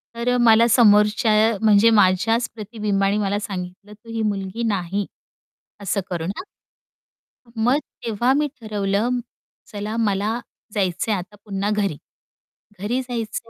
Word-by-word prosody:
तर 245 +1 0
मला 225 +1 +6
समोरच्या 215 0 +4 0.3
म्हणजे 215 +1 +5
माझ्याच 225 +6 +2
प्रतिबिंबानी 210 -2 -1
मला 205 0 0
सांगितलं, 195 0 -7
"तू 225 +2 -17
ही 225 - -2
मुलगी 200 +3 -4
नाही" 195 +2 -2 0.8
असं 200 0 -1
करून 170 0 -3
हं. - - -5 1.1
मग 245 +6 +2 0.3
तेव्हा 235 +3 +1
मी 295 +1 +1
ठरवलं, 215 +3 -1 0.5
"चला 210 +1 -5
मला 215 +1 0 0.3
जायचंय 190 +1 0
आता 195 +3 -7
पुन्हा 200 0 -2
घरी." 200 -8 -1 0.8
घरी 240 +6 -1
जायचंय 230 -2 -5
210 Hz, 120 wpm, -22 LUFS, 195-230 Hz, 1.1 s, मला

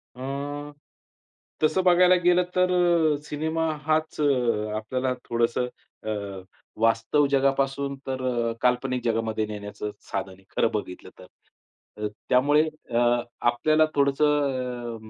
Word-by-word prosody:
अ, 140 +3 -5 0.9
तसं 185 +4 +3
बघायला 180 0 +6
गेलं, 180 +1 +4
तर 180 0 +3 0.6
सिनेमा 160 +2 -1 0.2
हाच 155 0 0
अ, 120 -7 +1
आपल्याला 130 +4 -2 0.2
थोडंसं 120 +1 +1 0.4
अ, - - 0 0.7
वास्तव 115 +6 +3
जगापासून 135 0 +1
तर 130 0 -2 0.4
काल्पनिक 125 0 +1
जगामध्ये 110 -2 0
नेण्याचं 105 0 -6 0.2
साधन 95 -1 -2
आहे, 95 +1 -19
खरं 115 - +2
बघितलं 95 -4 -5
तर. - - -12 0.8
अ, - - +1 0.2
त्यामुळे 145 +4 +4 0.3
अ, 115 - +1 0.5
आपल्याला 155 +6 +3
थोडंसं 135 -4 +1
135 Hz, 105 wpm, -25 LUFS, 115-150 Hz, 0.9 s, बघायला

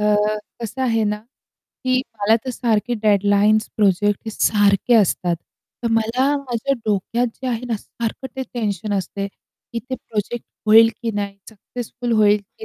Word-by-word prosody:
अ, - - 0 0.6
कसं 230 +4 -4
आहे 225 -3 +2
ना, 210 0 0 0.7
की 255 0 +3 0.2
मला 215 +2 +4
तर 260 - -2
सारखे 240 -1 0
डेडलाईन्स 205 +1 +4
प्रोजेक्ट 205 0 +3
हे - - -2
सारखे 205 +1 +3
असतात. 180 -5 +3 0.5
तर 235 - +1
मला 225 +4 +2
माझ्या 275 -1 -2
डोक्यात 215 +4 +1 0.2
जे - - -2
आहे 240 0 -2
ना, 225 - 0
सारखं 235 +5 -5
ते 265 - -1
टेन्शन 210 -3 -2
असते 200 +2 -4
की 230 +3 -11
ते 260 - 0
प्रोजेक्ट 225 0 -4 0.2
होईल 225 +1 +8
की 230 - 0
नाही, 200 -1 -3
सक्सेसफुल 240 +2 -5
होईल 210 0 +5 0.2
की 440 - -7
220 Hz, 155 wpm, -21 LUFS, 205-240 Hz, 0.7 s, होईल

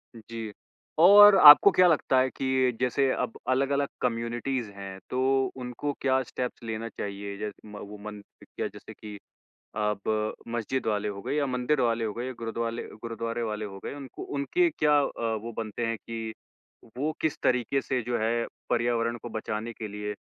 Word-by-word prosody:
जी। 115 -1 -7 0.5
और 205 +3 +9
आपको 150 +5 +10
क्या 180 0 +5
लगता 145 -5 +3
है 130 +1 +2
कि 130 -1 +1
जैसे 130 +2 +1
अब 125 -2 -3
अलग-अलग 140 +2 +1
कम्युनिटीज़ 120 0 -2
हैं, 95 -1 -8
तो 130 +1 +2
उनको 125 +3 -4
क्या 130 -1 +2
स्टेप्स 125 0 -5
लेना 115 0 -4
चाहिए? 100 -1 -6
जैस 105 0 -4
म 105 -1 -11
वो 105 +1 -9
मन 105 -1 -7 0.2
पि - - -15
क्या - - -4
जैसे - - -12
कि 105 -1 -10 0.6
अब 105 0 -1
मस्जिद 120 +2 -2
वाले 105 -1 0
हो 100 -1 -6
गए - - -3
या 145 -2 +1
मंदिर 130 +2 0
वाले 115 -1 +1
हो 105 - -3
गए, 120 +3 -4
या 130 - -4
गुरुद्वाले 115 0 -3 0.2
गुरुद्वारे 115 0 -4
वाले 105 -1 -3
हो 95 -1 -8
गए, - - -4
उनको 135 -3 -9
उनके 345 - +2
क्या 150 - +2
अ, 115 -5 -2
वो 115 - -5
बनते 115 +1 -3
है 115 0 -1
कि 115 -1 -6 0.6
वो 150 +4 0
किस 160 - 0
तरीके 125 +2 +1
से, 130 -1 -1
जो 120 +1 -1
है, 115 +2 0 0.2
पर्यावरण 120 -1 0
को 120 - -6
बचाने 110 +1 -4
के 110 -1 -6
लिए, 105 0 -5
115 Hz, 180 wpm, -27 LUFS, 110-130 Hz, 0.6 s, आपको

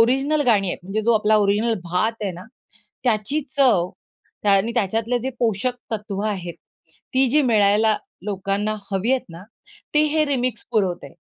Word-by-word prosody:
original 270 +6 +3
गाणी 205 -4 +4
आहेत, - - -3
म्हणजे 195 +4 -2
जो 235 +2 +3
आपला 215 0 +3
ओरिजिनल 210 +3 +2
भात 180 +6 0
आहे 195 -3 -2
ना, 180 +2 -10 0.6
त्याची 230 +5 +1 0.2
चव 220 -11 +4 0.6
आणि 200 +3 +3
त्याच्यातले 225 +2 0
जे 260 +3 -3
पोषक 240 +2 0 0.2
तत्त्व 210 -2 -3
आहेत, 180 -5 -3 0.6
ती 265 +1 +4
जी 300 +4 +4
मिळायला 215 -2 +3 0.3
लोकांना 200 +1 -1 0.2
हवी 195 +5 0
आहेत 265 - +1
ना, 170 +2 -10 0.5
ते 300 - +5
हे 310 -1 +3
रिमिक्स 255 -3 -1
पुरवतंय 180 -9 -1
215 Hz, 155 wpm, -22 LUFS, 195-245 Hz, 0.6 s, ते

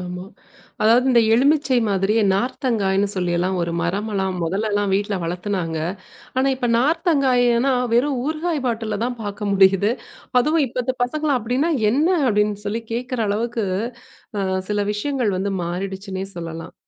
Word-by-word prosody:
ஆமா. 180 0 -6 0.6
அதாவது 235 +4 +4
இந்த 235 -2 +5
எலுமிச்சை 275 0 +3
மாதிரியே 200 +3 +2
நார்த்தங்காய்ன்னு 205 -3 0
சொல்லி 180 -2 -1
எல்லாம் 185 +2 0
ஒரு 170 0 -2
மரமெல்லாம் 190 +1 -1
முதல்ல 200 +6 -1
எல்லாம் 205 -1 +1
வீட்ல 205 +1 0
வளத்துனாங்க. 175 -2 -2 0.6
ஆனா, 265 +1 +3
இப்ப 245 -2 -2
நார்த்தங்காய்னா 265 -4 +2 0.2
வெறும் 260 +1 +2
ஊறுகாய் 315 -1 -2
பாட்டில்ல 225 -3 -2
தான் 245 -2 -4
பார்க்க 205 0 -4
முடியுது. 195 +2 +4 0.5
அதுவும் 305 +2 +2
இப்பத்து 250 +1 -2
பசங்க 305 +4 -2
அப்படின்னா 255 +9 0 0.2
என்ன 300 +7 +2 0.2
அப்படின்னு 210 -1 +1
சொல்லி 220 +3 -2
கேக்குற 250 +1 -3
அளவுக்கு 225 +1 -1 0.7
அ - - 0 0.3
சில 205 -1 +1
விஷயங்கள் 245 -1 -1
வந்து 200 +2 -1
மாறிடுச்சுன்னே 190 +2 -4
சொல்லலாம். 165 -1 -7
215 Hz, 135 wpm, -21 LUFS, 195-255 Hz, 0.7 s, இந்த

